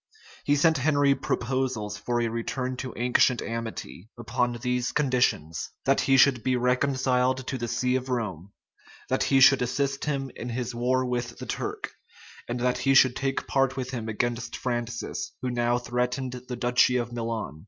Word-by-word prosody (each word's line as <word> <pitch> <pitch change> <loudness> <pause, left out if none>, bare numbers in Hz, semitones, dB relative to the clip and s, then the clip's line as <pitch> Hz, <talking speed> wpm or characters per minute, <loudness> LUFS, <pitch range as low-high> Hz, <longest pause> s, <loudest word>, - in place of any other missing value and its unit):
He 145 - +3
sent 160 0 +3
Henry 145 0 +3
proposals 125 -5 -2
for 120 +2 -2
a 120 - +1
return 125 +3 -3
to 130 0 -5
ancient 125 0 +3
amity, 110 - -6
upon 120 +1 -1
these 125 +1 -1
conditions:[] 125 - 0 0.2
that 135 0 +3
he 135 0 +4
should 130 -2 +5
be 130 +2 +1
reconciled 130 0 +1
to 130 - -3
the 120 -2 -3
see 125 +2 0
of 130 0 -2
Rome, 100 -7 -3 0.6
that - - +1
he 135 - +4
should 135 0 +7
assist 135 +2 -1
him 135 -3 -2
in 120 - -6
his 120 0 -3
war 130 +2 +1
with 120 -1 -3
the - - -7
Turk, - - -4 0.6
and 120 +1 -3
that 125 0 +1
he 135 0 +2
should 130 -2 +6
take 135 0 -2
part 135 0 +1
with 130 -1 -3
him 115 -3 -4
against 120 +2 -2
Francis, 120 -1 -3
who 125 - -1
now 120 0 +1
threatened 125 +2 -2 0.2
the 125 - -4
duchy 125 +1 +3
of 120 -1 -2
Milan. 115 -8 -4
125 Hz, 175 wpm, -26 LUFS, 120-130 Hz, 0.6 s, should